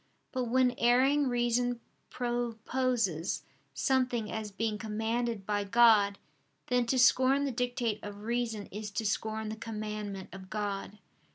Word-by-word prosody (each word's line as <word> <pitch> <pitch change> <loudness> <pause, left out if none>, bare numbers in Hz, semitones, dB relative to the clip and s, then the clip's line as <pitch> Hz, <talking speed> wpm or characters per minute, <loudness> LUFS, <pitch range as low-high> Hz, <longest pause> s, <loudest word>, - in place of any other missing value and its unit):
But 255 -2 -1
when 250 +1 +3
erring 265 +4 +4
reason 245 0 +1 0.3
proposes 240 -6 -1 0.3
something 250 -4 +1
as 220 -1 -4
being 210 +1 -2
commanded 225 0 -2
by 205 0 0
God, 205 -2 +5 0.5
then 245 -1 +2
to 260 - +1
scorn 260 +3 +5
the 275 - -1
dictate 245 -3 -1
of 205 0 -8
reason 230 -2 -2
is 210 +1 -5
to 220 +2 -3
scorn 220 +1 -1
the 215 - -4
commandment 210 -3 -5
of 190 -1 -10
God. 205 -1 -3
225 Hz, 130 wpm, -31 LUFS, 210-245 Hz, 0.5 s, God